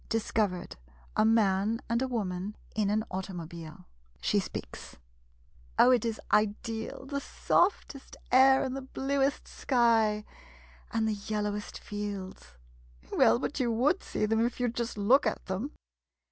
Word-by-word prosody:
Discovered 210 Hz, -, -1 dB, 0.2 s
— -, -, -27 dB
A -, -, +4 dB
man 220 Hz, 0 st, +3 dB
and 235 Hz, +1 st, 0 dB
a 265 Hz, -, +1 dB
woman 205 Hz, -4 st, -3 dB, 0.2 s
in 210 Hz, -2 st, +1 dB
an 215 Hz, +1 st, +1 dB
au 190 Hz, +1 st, -1 dB
tomobile. 170 Hz, -4 st, -8 dB, 0.3 s
She -, -, +2 dB
speaks -, -, -7 dB, 0.8 s
Oh, 250 Hz, -, +7 dB
it 245 Hz, -3 st, +3 dB
is 225 Hz, -1 st, -2 dB
ideal— 220 Hz, +4 st, 0 dB
the 280 Hz, +1 st, -3 dB
softest 315 Hz, -6 st, 0 dB
air, 265 Hz, +1 st, +6 dB
and 260 Hz, 0 st, -3 dB
the 270 Hz, -, -4 dB
bluest 270 Hz, +1 st, -1 dB
sky 225 Hz, -4 st, +2 dB, 0.3 s
— -, -, -25 dB
and 225 Hz, -1 st, +1 dB
the 220 Hz, -, +1 dB
yellowest 210 Hz, -1 st, -2 dB
fields! 200 Hz, -, -6 dB, 0.6 s
Well, 115 Hz, -, +5 dB
but 285 Hz, -, -3 dB
you 245 Hz, -3 st, +1 dB
would 270 Hz, -, +2 dB
see -, -, -2 dB
them, 225 Hz, +1 st, +2 dB
if 240 Hz, +2 st, -2 dB
you 245 Hz, 0 st, +1 dB
'd 230 Hz, -, -8 dB
just 235 Hz, -2 st, -3 dB
look 240 Hz, +6 st, +4 dB
at 215 Hz, -, -3 dB
them 190 Hz, +9 st, -3 dB
220 Hz, 155 wpm, -29 LUFS, 205-250 Hz, 0.8 s, Oh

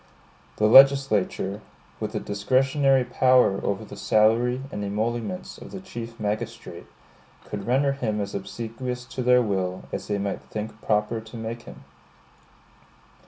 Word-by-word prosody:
The 105 Hz, -, +1 dB
legislature, 110 Hz, -6 st, +5 dB, 0.4 s
with -, -, -4 dB
a -, -, 0 dB
discretionary 130 Hz, +6 st, +2 dB
power 125 Hz, -4 st, +3 dB
over 100 Hz, +2 st, -2 dB
the 105 Hz, -, -10 dB
salary 115 Hz, +5 st, +2 dB
and 105 Hz, -, -4 dB
emoluments 115 Hz, -, -3 dB
of -, -, -10 dB
the 190 Hz, -, -7 dB
Chief 120 Hz, -10 st, -8 dB
Magistrate, 105 Hz, 0 st, -4 dB, 0.6 s
could 100 Hz, -1 st, -6 dB
render 135 Hz, +3 st, +3 dB
him 115 Hz, -6 st, -2 dB
as 100 Hz, -1 st, -4 dB
obsequious 115 Hz, +5 st, -5 dB
to 130 Hz, +1 st, -6 dB
their 125 Hz, 0 st, +4 dB
will 95 Hz, -3 st, -2 dB
as -, -, -5 dB
they 105 Hz, -, -1 dB
might 100 Hz, 0 st, -3 dB
think 105 Hz, 0 st, -7 dB
proper 105 Hz, +1 st, 0 dB
to 110 Hz, +2 st, -11 dB
make 115 Hz, +1 st, -5 dB
him. -, -, -13 dB
115 Hz, 140 wpm, -25 LUFS, 105-125 Hz, 0.6 s, legislature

